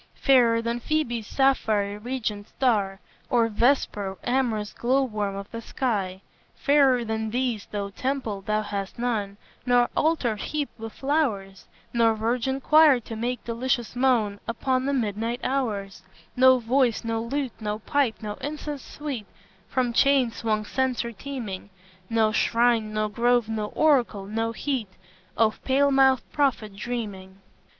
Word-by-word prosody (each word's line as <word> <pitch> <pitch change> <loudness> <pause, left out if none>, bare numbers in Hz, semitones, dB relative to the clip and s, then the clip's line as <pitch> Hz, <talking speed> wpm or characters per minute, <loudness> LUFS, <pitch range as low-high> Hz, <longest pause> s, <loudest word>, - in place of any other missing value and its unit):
Fairer 235 -4 +4
than 235 +1 -1
Phoebe's 240 -5 -1
sapphire 215 -7 +1
regioned 220 -3 -4
star 205 -7 0 0.3
Or 230 -2 +3
Vesper, 210 -4 +1
amorous 240 -5 0
glow 260 +3 +1
worm 210 -5 -2
of 200 +1 -7
the 230 - -6
sky; 200 -7 -2 0.3
Fairer 275 -4 +3
than 220 0 -2
these, 240 -3 -2
though 200 -1 -4
temple 250 -4 -3
thou 215 +2 -1
hast 200 -2 -5
none, 215 -5 -2 0.3
Nor 245 -1 +3
altar 300 -9 +1
heaped 290 +5 -4
with 225 0 -6
flowers; 230 -10 -1 0.3
Nor 230 -2 +3
virgin 245 +4 -1
choir 305 -2 +6
to 225 - -8
make 240 +2 -3
delicious 240 0 -2
moan 235 -6 +2
Upon 255 +3 0
the 280 - +1
midnight 230 -1 -1
hours; 215 -8 -2 0.3
No 260 0 +6
voice, 245 0 +1
no 225 -1 -1
lute, 260 +2 -2
no 210 0 -2
pipe, 265 0 0
no 210 -1 -3
incense 295 -1 -5
sweet, 275 -9 -6 0.4
From 250 -2 0
chain 270 -2 +4
swung 215 -2 -1
censor 255 -1 -1
teeming; 225 -5 -6 0.4
No 225 -1 +2
shrine, 230 -1 +2
no 215 0 0
grove, 240 +2 +2
no 220 -1 -2
oracle, 245 -9 +2
no 225 +3 -2
heat 245 -3 -2 0.5
Of 220 -1 +1
pale 280 +1 +3
mouthed 265 -3 +4
prophet 240 -8 0
dreaming." 200 -5 -5
235 Hz, 140 wpm, -25 LUFS, 215-260 Hz, 0.5 s, choir